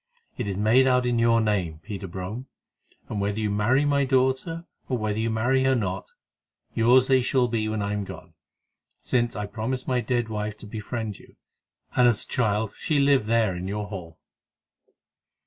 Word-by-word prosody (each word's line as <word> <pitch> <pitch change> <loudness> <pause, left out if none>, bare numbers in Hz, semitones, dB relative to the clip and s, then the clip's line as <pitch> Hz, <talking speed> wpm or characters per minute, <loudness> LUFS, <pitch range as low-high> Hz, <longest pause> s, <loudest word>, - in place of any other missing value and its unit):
It - - -3
is 95 -2 -2
made 115 +6 +4
out 125 -1 +3
in 120 -1 +1
your 115 0 +4
name, 100 -8 0
Peter 100 +1 -6
Brome, 95 +8 -6 0.6
and 105 - -3
whether 100 +1 -1
you 105 -2 0
marry 120 +8 +2
my 140 -1 +2
daughter, 130 +6 +1 0.2
or 130 - +1
whether 110 -1 -2
you 115 +1 0
marry 125 +4 +2
her 135 0 +4
not, 95 -5 -2 0.6
yours 125 +3 +5
they 130 -1 +4
shall 125 0 +2
be 110 -2 -1
when 110 -1 -2
I 100 0 -1
am 105 -1 -2
gone, - - -10 0.7
since 120 -3 0
I 105 +1 -3
promised 120 +5 -4
my 125 -1 +1
dead 120 -2 0
wife 105 -1 -4
to - - -12
befriend 110 0 -5
you, - - -18 0.6
and 125 -1 +5
as 115 -3 +2
a - - -22
child 110 -3 0
she 150 -3 0
lived 140 -5 +3
there 110 -4 +2
in 90 +1 -5
your 105 +1 -3
Hall." 85 -5 -8
110 Hz, 185 wpm, -25 LUFS, 105-125 Hz, 0.7 s, yours